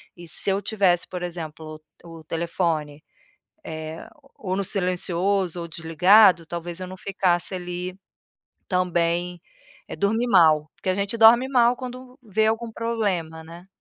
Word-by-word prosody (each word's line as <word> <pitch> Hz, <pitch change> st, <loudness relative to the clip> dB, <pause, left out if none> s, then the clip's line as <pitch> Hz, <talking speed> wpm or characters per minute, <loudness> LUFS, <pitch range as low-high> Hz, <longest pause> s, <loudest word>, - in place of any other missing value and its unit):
E 175 Hz, -1 st, -12 dB
se 195 Hz, -, -2 dB
eu 195 Hz, -, 0 dB
tivesse, 195 Hz, -4 st, +1 dB
por 180 Hz, -1 st, -6 dB
exemplo, 160 Hz, -2 st, -7 dB, 0.2 s
o 165 Hz, -1 st, -11 dB
o 160 Hz, -, -15 dB
telefone, 160 Hz, -2 st, -2 dB, 0.6 s
eh, 160 Hz, 0 st, -7 dB
o 275 Hz, -, -25 dB, 0.2 s
ou -, -, +1 dB
no 195 Hz, -, -1 dB
silencioso 185 Hz, -1 st, 0 dB
ou 170 Hz, -, -6 dB
desligado, 170 Hz, +3 st, +4 dB
talvez 170 Hz, +1 st, -6 dB
eu 185 Hz, -, -6 dB
não 185 Hz, -, -9 dB
ficasse 185 Hz, -1 st, -1 dB
ali 180 Hz, +1 st, -6 dB, 0.7 s
também 175 Hz, -1 st, 0 dB, 0.5 s
eh, -, -, -7 dB
dormir 220 Hz, +4 st, 0 dB
mal. 155 Hz, -5 st, +4 dB
Porque -, -, -7 dB
a 185 Hz, -, +2 dB
gente 200 Hz, +3 st, -1 dB
dorme 235 Hz, +3 st, +6 dB
mal 245 Hz, -2 st, +3 dB
quando 255 Hz, 0 st, -9 dB
vê 215 Hz, -1 st, 0 dB
algum 225 Hz, +1 st, -1 dB
problema, 195 Hz, -9 st, -2 dB
né? 170 Hz, +3 st, -13 dB
180 Hz, 150 wpm, -24 LUFS, 165-205 Hz, 0.7 s, dorme